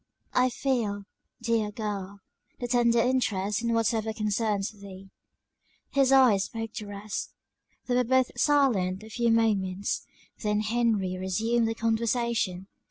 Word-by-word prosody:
"I 250 Hz, 0 st, +3 dB
feel, 235 Hz, -6 st, -1 dB, 0.4 s
dear 230 Hz, -2 st, +1 dB
girl, 200 Hz, -2 st, -5 dB, 0.4 s
the 245 Hz, -, -3 dB
tendered 235 Hz, -1 st, +3 dB
interest 210 Hz, -5 st, 0 dB
in 235 Hz, 0 st, 0 dB
whatever 225 Hz, -1 st, +1 dB
concerns 210 Hz, -1 st, -1 dB
thee." 195 Hz, -2 st, -12 dB, 0.8 s
His 275 Hz, -2 st, +3 dB
eyes 245 Hz, -8 st, +5 dB
spoke 225 Hz, -1 st, -6 dB
the 210 Hz, -, -6 dB
rest. 205 Hz, +1 st, -5 dB, 0.5 s
They 250 Hz, -, -1 dB
were 250 Hz, -, +3 dB
both 260 Hz, +1 st, +2 dB
silent 215 Hz, -10 st, +2 dB
a 220 Hz, -, -12 dB
few 235 Hz, +2 st, +1 dB
moments; 205 Hz, -4 st, 0 dB, 0.3 s
then 210 Hz, -1 st, +1 dB
Henry 215 Hz, -5 st, 0 dB
resumed 225 Hz, +5 st, +1 dB
the 225 Hz, -, -2 dB
conversation. 225 Hz, -4 st, 0 dB
220 Hz, 130 wpm, -27 LUFS, 200-235 Hz, 0.8 s, eyes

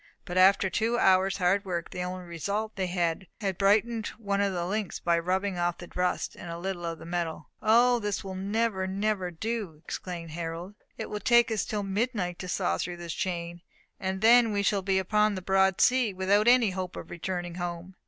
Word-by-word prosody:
But 175 Hz, -, -6 dB
after 190 Hz, +1 st, +5 dB
two 225 Hz, +6 st, 0 dB
hours' 190 Hz, -2 st, +4 dB
hard 195 Hz, +2 st, +2 dB
work, 175 Hz, -3 st, -4 dB
the 180 Hz, -, -4 dB
only 180 Hz, 0 st, -4 dB
result 200 Hz, +6 st, -3 dB
was 190 Hz, -2 st, -1 dB
that -, -, -6 dB
they 175 Hz, +2 st, -2 dB
had 190 Hz, -2 st, -1 dB
brightened 215 Hz, +3 st, +2 dB
one 200 Hz, -3 st, -1 dB
of 200 Hz, -1 st, +1 dB
the 175 Hz, -2 st, -2 dB
links 205 Hz, +1 st, -2 dB
by 170 Hz, 0 st, +2 dB
rubbing 185 Hz, +2 st, -1 dB
off 175 Hz, 0 st, 0 dB
the 175 Hz, -, -11 dB
rust 180 Hz, 0 st, -1 dB
and 175 Hz, -, -9 dB
a 170 Hz, -, -5 dB
little 175 Hz, -1 st, -4 dB
of 165 Hz, -1 st, -3 dB
the -, -, -11 dB
metal. 170 Hz, -1 st, -3 dB
"O, 240 Hz, +3 st, +5 dB
this 205 Hz, -3 st, -2 dB
will 190 Hz, -1 st, -6 dB
never, 195 Hz, 0 st, -1 dB
never 195 Hz, -1 st, -1 dB
do!" 195 Hz, -2 st, -4 dB
exclaimed 170 Hz, -3 st, -6 dB
Harold. 170 Hz, +3 st, -5 dB, 0.2 s
"It -, -, -6 dB
will 210 Hz, -, -3 dB
take 235 Hz, +1 st, +4 dB
us 215 Hz, -2 st, 0 dB
till 210 Hz, -1 st, -2 dB
midnight 195 Hz, -3 st, -2 dB
to 185 Hz, -, -5 dB
saw 85 Hz, -, 0 dB
through 175 Hz, 0 st, -3 dB
this 170 Hz, -1 st, -5 dB
chain, 175 Hz, -2 st, -3 dB, 0.4 s
and 190 Hz, 0 st, -3 dB
then 230 Hz, 0 st, +6 dB
we 200 Hz, -1 st, 0 dB
shall 200 Hz, -1 st, +2 dB
be 190 Hz, 0 st, +1 dB
upon 210 Hz, +2 st, +2 dB
the -, -, -3 dB
broad 190 Hz, 0 st, +3 dB
sea, 250 Hz, -5 st, +3 dB
without 200 Hz, +4 st, +2 dB
any 240 Hz, -4 st, +5 dB
hope 185 Hz, -1 st, -4 dB
of -, -, -8 dB
returning 175 Hz, 0 st, -4 dB
home. 175 Hz, +1 st, -5 dB
190 Hz, 210 wpm, -28 LUFS, 175-210 Hz, 0.4 s, then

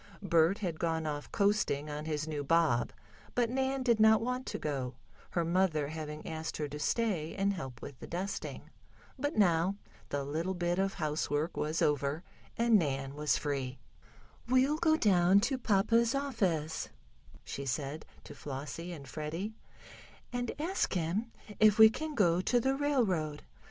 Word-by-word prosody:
Bert 170 Hz, +1 st, +3 dB
had 175 Hz, -7 st, -3 dB
gone 160 Hz, -1 st, 0 dB
off 145 Hz, -1 st, -4 dB
coasting 200 Hz, -8 st, +1 dB
on 150 Hz, 0 st, -5 dB
his 155 Hz, -1 st, -2 dB
new 150 Hz, -2 st, -3 dB
bob, 155 Hz, -5 st, +2 dB, 0.4 s
but 240 Hz, -1 st, +2 dB
Nan 265 Hz, +1 st, 0 dB
did 235 Hz, -3 st, +3 dB
not 220 Hz, 0 st, +6 dB
want 250 Hz, +2 st, -3 dB
to -, -, -3 dB
go, 135 Hz, -4 st, -3 dB, 0.3 s
her 170 Hz, -2 st, 0 dB
mother 165 Hz, -4 st, +1 dB
having 155 Hz, -1 st, -6 dB
asked 160 Hz, 0 st, -4 dB
her 150 Hz, -, -2 dB
to 150 Hz, +1 st, -6 dB
stay 175 Hz, -1 st, 0 dB
and 200 Hz, 0 st, +1 dB
help 130 Hz, -9 st, -7 dB
with 135 Hz, -, -9 dB
the -, -, -8 dB
dusting. 190 Hz, +3 st, -5 dB, 0.5 s
But 290 Hz, +2 st, -1 dB
now 180 Hz, -1 st, +3 dB, 0.3 s
the 140 Hz, -1 st, -1 dB
little 165 Hz, +7 st, -2 dB
bit 175 Hz, +1 st, 0 dB
of 195 Hz, 0 st, 0 dB
housework 150 Hz, 0 st, -1 dB
was 155 Hz, +2 st, 0 dB
over, 145 Hz, +2 st, 0 dB, 0.3 s
and 230 Hz, -2 st, +5 dB
Nan 135 Hz, -4 st, -2 dB
was 150 Hz, +1 st, +1 dB
free. 135 Hz, -3 st, -3 dB, 0.7 s
"We'll 260 Hz, +4 st, +3 dB
go 315 Hz, -1 st, +4 dB
down 190 Hz, -, +5 dB
to 260 Hz, +4 st, 0 dB
papa's 230 Hz, +2 st, +3 dB
office," 190 Hz, -, -1 dB, 0.5 s
she 140 Hz, 0 st, -6 dB
said 140 Hz, +3 st, -3 dB, 0.2 s
to -, -, -10 dB
Flossie 145 Hz, +5 st, -6 dB
and 145 Hz, -5 st, -8 dB
Freddie, 160 Hz, -, -4 dB, 0.8 s
"and 245 Hz, -1 st, -1 dB
ask 350 Hz, +6 st, 0 dB
him 185 Hz, +7 st, -1 dB, 0.3 s
if 215 Hz, 0 st, +6 dB
we 220 Hz, 0 st, +9 dB
can 310 Hz, +4 st, -5 dB
go 180 Hz, -5 st, +3 dB
to 245 Hz, +6 st, +2 dB
the 265 Hz, +3 st, +1 dB
railroad. 200 Hz, -, 0 dB
170 Hz, 160 wpm, -32 LUFS, 150-220 Hz, 0.8 s, we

